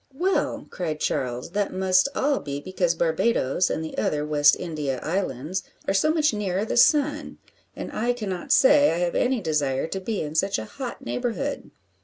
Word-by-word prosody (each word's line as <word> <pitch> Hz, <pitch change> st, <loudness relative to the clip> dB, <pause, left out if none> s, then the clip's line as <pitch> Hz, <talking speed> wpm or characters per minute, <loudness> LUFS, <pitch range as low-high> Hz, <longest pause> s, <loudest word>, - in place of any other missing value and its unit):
"Well," 370 Hz, +6 st, 0 dB
cried 155 Hz, -4 st, -3 dB
Charles, 125 Hz, -3 st, -2 dB
"that 205 Hz, -1 st, -1 dB
must 185 Hz, +5 st, +2 dB
all 280 Hz, 0 st, +1 dB
be 140 Hz, -1 st, -5 dB
because 175 Hz, +1 st, -1 dB
Barbadoes, 165 Hz, -, +1 dB
and 160 Hz, -, -2 dB
the 160 Hz, -, -7 dB
other 150 Hz, 0 st, 0 dB
West 145 Hz, -1 st, +4 dB
India 150 Hz, -6 st, -3 dB
islands, 170 Hz, 0 st, -2 dB, 0.3 s
are -, -, +2 dB
so 200 Hz, +11 st, +3 dB
much 310 Hz, -5 st, +2 dB
nearer 200 Hz, -1 st, -1 dB
the -, -, -3 dB
sun, 295 Hz, +3 st, +3 dB, 0.4 s
and -, -, -6 dB
I 235 Hz, +3 st, 0 dB
cannot 195 Hz, -7 st, -5 dB
say 290 Hz, +2 st, +6 dB
I 165 Hz, -, 0 dB
have 175 Hz, 0 st, 0 dB
any 250 Hz, -2 st, +1 dB
desire 145 Hz, -6 st, 0 dB
to 190 Hz, +4 st, -4 dB
be 210 Hz, +2 st, -3 dB
in 150 Hz, 0 st, -6 dB
such 195 Hz, +5 st, +1 dB
a 110 Hz, -, -5 dB
hot 255 Hz, -, -7 dB
neighbourhood." 255 Hz, +3 st, -3 dB
185 Hz, 180 wpm, -24 LUFS, 155-240 Hz, 0.4 s, say